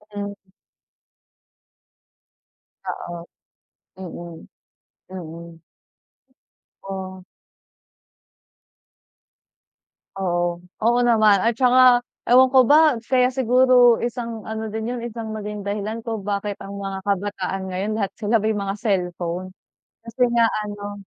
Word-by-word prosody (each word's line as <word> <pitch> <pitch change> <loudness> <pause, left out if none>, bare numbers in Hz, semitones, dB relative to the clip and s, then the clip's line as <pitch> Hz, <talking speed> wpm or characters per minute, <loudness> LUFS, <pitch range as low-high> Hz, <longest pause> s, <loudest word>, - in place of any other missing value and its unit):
Mm. 200 0 -4 2.5
Oo. 170 -1 -6 0.7
Mm. 175 -2 -9 0.7
Mm. 170 -2 -9 1.2
Oh. 190 -1 -7 2.9
Oo. 175 -2 -1 0.2
Oo 240 +2 +3
naman, 215 -5 +4
at 230 +1 +2
tsaka 255 -1 +6 0.3
ewan 255 +1 +7
ko 265 - +7
ba, 300 +2 +5
kaya 250 +1 +3
siguro 250 -1 +5
isang 235 -2 -4
ano 220 0 -4
din 220 +1 -4
'yon, 245 0 -4
isang 225 -2 -6
naging 210 -1 -6
dahilan 210 +2 -3
kung 225 -3 -4
bakit 200 0 -2
ang 200 0 -7
mga 195 -1 -4
kabataan 195 -1 -2
ngayon, 190 +3 -3
lahat 200 -3 -1
sila 220 +1 +1
may 215 +1 0
mga 200 -1 -2
cellphone. 180 -3 -2 0.5
Kasi 230 +2 -4
nga 235 -1 +4 0.2
ano, 205 0 -7
205 Hz, 100 wpm, -22 LUFS, 190-235 Hz, 2.9 s, ewan